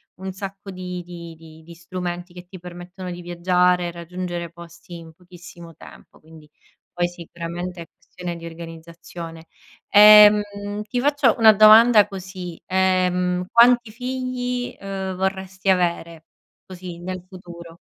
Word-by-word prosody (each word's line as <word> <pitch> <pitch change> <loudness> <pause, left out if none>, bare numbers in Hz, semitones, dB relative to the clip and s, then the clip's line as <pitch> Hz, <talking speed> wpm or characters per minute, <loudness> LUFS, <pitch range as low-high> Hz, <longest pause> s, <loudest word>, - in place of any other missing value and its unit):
un 190 +1 -7
sacco 195 +1 -8
di 180 -1 -7
di 170 -1 -10
di 160 0 -16
di 170 +1 -13
strumenti 175 +1 -6
che 180 0 -12
ti 185 +1 -11
permettono 180 +1 -9
di 175 0 -8
viaggiare 180 +1 +1
e - - -5
raggiungere 175 0 -6
posti 170 0 -12
in 165 -1 -13
pochissimo 175 -1 -14
tempo, - - -16
quindi 155 -1 -17 0.4
poi 175 0 -1
sicuramente 175 +1 -7
è 165 - -10
questione 180 -1 -8
di 170 0 -10
organizzazione. 165 0 -10 0.4
Ehm, 210 0 +8 0.4
ti 225 +3 -3
faccio 280 -3 +2
una 220 -1 +8
domanda 215 +1 +7
così, 185 -3 -9
ehm, 180 -1 +1
quanti 240 0 +5
figli, 250 0 -4
uhm, 195 -1 -5
vorresti 190 0 -3
avere, 170 -3 -2 0.4
così, 180 -2 -9
nel 185 0 -6
futuro? 170 -3 -12
180 Hz, 135 wpm, -21 LUFS, 170-190 Hz, 0.4 s, Ehm